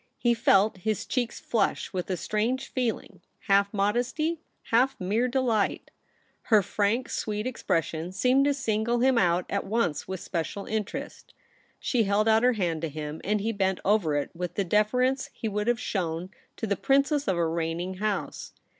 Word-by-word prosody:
He 240 -1 +2
felt 215 -3 +3
his 215 +3 -2
cheeks 245 -3 -2
flush 230 - -1
with 180 0 -3
a 185 - -1
strancre 240 +8 -1
feeline, 225 -7 -3 0.2
half 200 -1 +3
modesty, 245 +11 0 0.3
half 250 +3 +3
mere 210 +7 +1
delight. 245 -5 0 0.5
Her 215 -4 +5
frank, 215 +7 0
sweet 210 0 -3
expression 165 -8 -1
seemed 255 +7 +3
to 285 - +3
single 235 -2 0
him 260 -1 +4
out 175 -1 +2
at 200 - -1
once 195 -8 -1
w^ith 190 - -4
especial 175 +2 -4
interest. 215 -2 -5 0.4
She 235 -4 +1
held 200 +2 +2
out 220 0 +5
her 250 +1 +4
hand 175 -7 -1
to 165 - -2
him, 150 +1 -6
and 210 +2 0
he 225 +3 0
bent 190 -3 0
over 195 -7 +2
it 145 -1 -1
with 180 0 -5
the 200 - +1
deference 250 +7 +1
he 225 - -4
would 210 +1 -2
have 240 -1 +2
shown 180 -4 -3 0.3
to - - -2
the 200 -2 0
princess 275 +4 +2
of 190 -3 +1
a 170 -1 +2
reigning 170 +3 -2
house. 210 0 -3
210 Hz, 170 wpm, -27 LUFS, 185-240 Hz, 0.5 s, Her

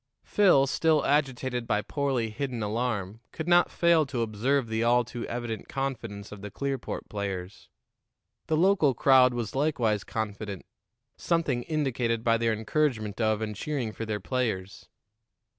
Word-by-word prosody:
Phil, 185 -10 +4
still 155 +1 +2
agitated 130 -4 0
by 105 0 +1
poorly 135 -6 -1
hidden 125 -2 -3
alarm, 105 -2 -2
could 160 - -6
not 175 0 +5
fail 170 -2 +3
to 130 -5 -2
observe 120 +5 0
the 110 +1 -1
all 120 +1 +4
too 120 +1 -6
evident 120 -2 -5
confidence 115 -7 -4
of 105 -2 -9
the 105 - -6
Clearport 135 +3 -4
players. 100 -2 -5 0.8
The 155 - +1
local 170 -6 +3
crowd 130 -1 +5
was 115 -4 -3
likewise 125 -8 +1
confident, 105 -3 -5 0.5
something 160 -8 0
indicated 125 -6 -1
by 115 -1 +3
their 115 0 +2
encouragement 110 -1 -1
of 110 -1 +1
and 105 -1 -4
cheering 130 -1 -3
for 115 +1 -6
their 105 -1 -2
players. 100 -5 -3
120 Hz, 145 wpm, -28 LUFS, 110-140 Hz, 0.8 s, not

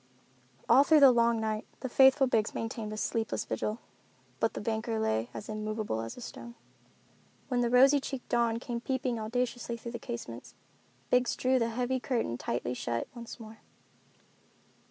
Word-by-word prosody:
All 275 - +7
through 305 0 +5
the 275 -2 +9
long 235 -1 +3
night 220 0 -2
the 260 - -2
faithful 265 +2 +5
Biggs 225 -4 0
maintained 225 -1 -4
a 215 - -5
sleepless 220 +1 -2
vigil, 210 +1 -2 0.6
but 225 - 0
the - - -3
banker 220 +1 -2
lay 110 - 0
as 210 - -8
immovable 215 - -3
as 115 - -7
a - - -9
stone. 235 0 -9 0.9
When 250 -2 +1
the 240 - +1
rosy 270 +4 +6
cheeked 270 -2 -6
dawn 235 -1 +1
came 235 0 -5
peeping 255 -2 -1
audaciously 235 +1 -2
through 235 +1 -7
the 235 - -6
casements, 120 - -7 0.6
Biggs 250 -1 +3
drew 260 0 +2
the 230 -1 +1
heavy 250 +3 -1
curtains 230 - -2
tightly 120 +1 -2
shut 115 -1 -3
once 235 +1 -9
more. 220 -1 -11
235 Hz, 165 wpm, -30 LUFS, 215-250 Hz, 0.9 s, the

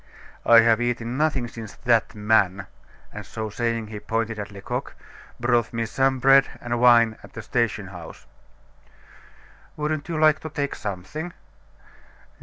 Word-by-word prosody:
"I 115 -1 +9
have 115 0 +3
eaten 120 0 -2
nothing 135 -4 0
since 115 -3 -9
that 115 -2 +1
man" 105 -3 +2 0.5
and - - -7
so 110 -1 -6
saying 115 0 -1
he 105 -1 -8
pointed 115 +1 -2
to 100 - -13
Lecoq 100 -1 -5 0.4
"brought 120 -1 +1
me 115 0 -1
some 135 +3 +1
bread 135 +1 +5
and 120 -1 -3
wine 115 -2 +5
at - - -15
the 115 - -7
station 105 -4 -1
house." 90 -4 -11 1.5
"Wouldn't 150 +1 -2
you 165 - -2
like 155 0 +4
to 160 - -7
take 140 -1 -3
something?" 105 - -6
115 Hz, 145 wpm, -24 LUFS, 110-135 Hz, 1.5 s, I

